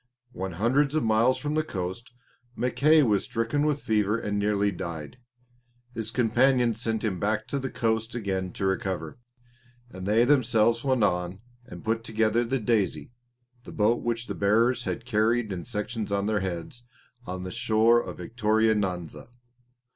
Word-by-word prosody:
When 95 -4 -5
hundreds 135 - +1
of 155 - +1
miles 115 +3 +3
from 145 +3 -3
the 155 - +2
coast, 95 -1 -5 0.4
Mackay 150 +5 +3
was 105 -6 +2
stricken 120 +7 -1
with 150 -1 -1
fever 105 0 +1
and 105 -2 -2
nearly 100 0 +1
died. 85 - -7 0.7
His 115 -2 -3
companions 120 0 +2
sent 110 -2 -1
him 100 -5 -1
back 110 +2 0
to 140 - -1
the 135 0 -4
coast 110 0 -1
again 95 -5 -2
to 95 - -3
recover, 95 -3 -2 0.7
and 95 0 -7
they 110 +3 +4
themselves 115 -4 +3
went 130 -4 +2
on 90 0 0 0.3
and - - -11
put 115 +1 0
together 110 0 +1
the 125 +3 -1
Daisy, 110 -3 0 0.5
the - - -10
boat 110 +2 +1
which 115 0 -2
the - - -4
bearers 115 +5 +2
had 115 - -4
carried 115 -1 +1
in 90 -2 -5
sections 105 0 -4
on 100 0 0
their 105 0 +1
heads, 95 +5 -5 0.4
on 90 0 -5
the 95 - -6
shore 115 +4 +3
of - - -8
Victoria 110 -1 +1
Nyanza. 90 -6 -3
110 Hz, 160 wpm, -26 LUFS, 100-120 Hz, 0.7 s, they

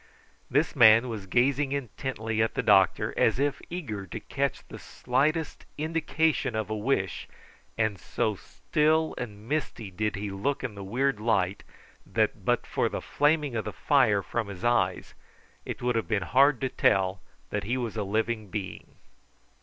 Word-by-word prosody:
This 145 +6 +1
man 115 -1 +7
was 105 -4 -6
gazing 135 +6 +2
intently 115 -4 -3
at 110 - 0
the - - 0
doctor, 95 -2 +4
as 110 - +3
if 140 +1 0
eager 110 - -5
to - - -6
catch - - -3
the - - -10
slightest 150 +6 -1
indication 160 -2 0
of 110 0 -2
a - - 0
wish, 105 -5 -1 0.5
and 110 -3 0
so 110 -3 -1
still 155 - 0
and 105 -3 -7
misty 130 -8 -3
did 105 +3 -2
he 100 0 -4
look 115 +10 -2
in 125 -5 -3
the 100 -1 -8
weird 125 +4 0
light 100 -4 +1 0.4
that - - -1
but - - +1
for - - 0
the - - -4
flaming 150 -3 +1
of 110 - -2
the - - -3
fire 120 -9 +3
from 115 +1 -3
his 100 0 -9
eyes 95 -7 +1 0.5
it - - -6
would 125 -1 +1
have 110 -6 -1
been 100 -1 0
hard 135 +6 +4
to 130 - 0
tell 95 -5 +1 0.3
that - - -2
he 120 +5 -1
was 120 -4 -3
a 110 - -1
living 110 +2 -1
being. 100 -1 -6
115 Hz, 170 wpm, -27 LUFS, 105-140 Hz, 0.5 s, man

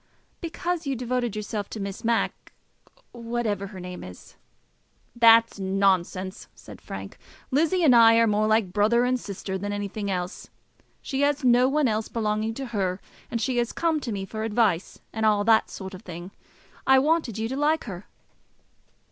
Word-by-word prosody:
"Because 340 -1 -3
you 275 - 0
devoted 245 -2 -2
yourself 210 -1 -4
to 220 - -7
Miss 195 -1 -5
Mac 230 0 -1 0.6
whatever 230 -4 -3
her 190 -1 -10
name 180 0 -7
is." 90 0 -12 0.8
"That's 230 -2 +6
nonsense," 190 0 0
said - - -13
Frank; - - -8 0.3
"Lizzie 330 +6 +2
and 265 -6 +6
I 230 -1 +7
are 230 0 +5
more 215 0 +2
like 215 -4 +1
brother 220 +4 +3
and 255 0 +1
sister 190 -2 -5
than 205 +2 -3
anything 205 0 -4
else. 180 0 -4 0.5
She 270 -1 -2
has 285 0 +1
no 250 +1 +5
one 295 0 +2
else 215 -1 -1
belonging 220 0 -1
to 270 - -5
her, 190 -2 -1 0.3
and 230 - -2
she 250 +2 -1
has 240 0 +2
to - - -10
come 330 -2 +1
to 250 -5 -5
me 195 -2 -3
for 215 +2 -6
advice, 215 -5 0
and 220 - -3
all 210 -1 +3
that 220 0 +4
sort 190 0 -8
of 185 - -9
thing. 175 -1 -9 0.6
I 265 0 +7
wanted 285 - +1
you 220 0 -1
to 265 - -3
like 300 +3 +1
her." 195 -3 -8
220 Hz, 175 wpm, -25 LUFS, 200-250 Hz, 0.8 s, I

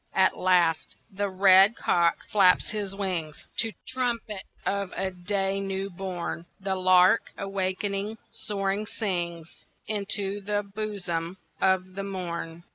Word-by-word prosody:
At 190 0 +4
last 175 -3 +2 0.2
the 200 +1 -1
red 190 +2 +6
cock 170 -1 +2
flaps 190 -3 +4
his 205 -2 -4
wings 175 -6 -3
To 225 -1 +1 0.2
trumpet 235 -5 -2 0.2
of 200 -1 -1
a 190 0 -1
day 195 +2 -1
new 195 0 -3
born. 175 -2 -4
The 195 0 -1
lark, 185 +2 +5
awaking, 195 +2 -2
soaring 200 0 -2
sings 170 -6 -3 0.2
Into 205 -1 -1
the 205 +1 0
bosom 195 -4 -4 0.2
of 185 0 +2
the 195 +1 -4
morn. 170 -3 -5
195 Hz, 120 wpm, -27 LUFS, 180-200 Hz, 0.2 s, red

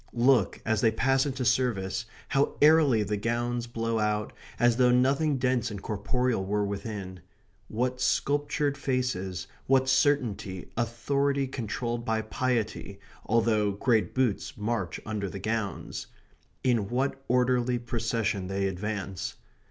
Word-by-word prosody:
Look, 120 -3 +3
as 110 -1 +1
they 115 - +5
pass 135 +5 +2
into 130 -2 -3
service, 115 -3 0 0.2
how 140 +1 +1
airily 150 -7 +5
the 105 +1 -2
gowns 120 +2 -1
blow 115 -1 -1
out, 105 0 0 0.3
as 120 -1 +4
though 125 -1 +5
nothing 135 +4 +3
dense 125 -2 +1
and 105 -2 -6
corporeal 110 +2 -1
were 105 +1 0
within. 100 -2 -5 0.5
What 125 +3 -2
sculptured 145 +1 +1
faces, 95 -10 -1 0.2
what 130 0 +4
certainty, 120 - +1
authority 140 +4 0
controlled 120 -1 -3
by 110 -1 0
piety, 110 -6 -2 0.3
although 110 -2 +2
great 110 +2 +1
boots 125 -6 0
march 105 -5 -2
under 105 -2 -3
the 100 - -7
gowns. 110 0 -3 0.6
In 115 -6 +1
what 135 +2 -1
orderly 125 0 +2
procession 115 -5 -1
they 95 +1 0
advance. 95 -2 -4
115 Hz, 130 wpm, -28 LUFS, 105-130 Hz, 0.6 s, they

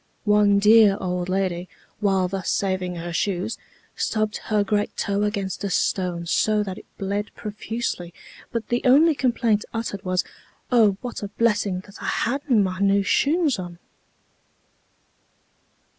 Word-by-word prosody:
One 210 -1 +4
dear 210 -1 +6
old 180 -1 -2
lady, 185 -2 -1 0.3
while 195 -3 +2
thus 190 0 -3
saving 185 -2 -1
her 170 0 -5
shoes, 190 +4 -1 0.4
stubbed 215 -1 -1
her 210 -2 +2
great 205 0 -1
toe 200 0 0
against 205 -2 -2
a 200 - -1
stone 180 -2 0
so 210 +4 +2
that 190 -1 -6
it - - -17
bled 200 +1 -2
profusely, 210 -4 -4 0.4
but 230 -1 -4
the 240 0 +1
only 295 +6 +6
complaint 235 -5 +1
uttered 225 -3 -3
was, 185 0 0 0.5
"Oh, 215 -5 +4
what 245 -1 -6
a 205 - -3
blessing 205 -3 0
that 200 +1 -15
I - - -6
hadna 270 +1 0
my 190 -3 +1
new 200 0 +3
shoons 290 - +2
on." 175 -2 -7
205 Hz, 145 wpm, -23 LUFS, 185-220 Hz, 0.5 s, dear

